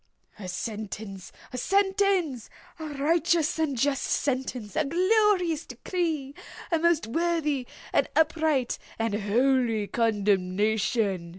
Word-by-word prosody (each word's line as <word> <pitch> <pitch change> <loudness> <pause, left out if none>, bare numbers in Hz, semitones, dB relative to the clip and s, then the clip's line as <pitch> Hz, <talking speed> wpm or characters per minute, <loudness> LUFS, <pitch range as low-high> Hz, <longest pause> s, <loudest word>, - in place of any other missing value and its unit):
"A 190 - -6
sentence!—a 210 +2 -6
sentence!—a 385 - 0
righteous 325 +2 +1
and 295 -5 0
just 275 +2 +1
sentence!—a 255 -1 -1
glorious 360 -1 +2
decree!—a 320 -1 -3
most 340 -1 +2
worthy 300 -1 0 0.3
and - - +2
upright, 310 -5 +1 0.2
and 225 -2 -1
holy 225 +1 +2
condemnation!" 205 -2 +1
275 Hz, 85 wpm, -27 LUFS, 220-330 Hz, 0.3 s, glorious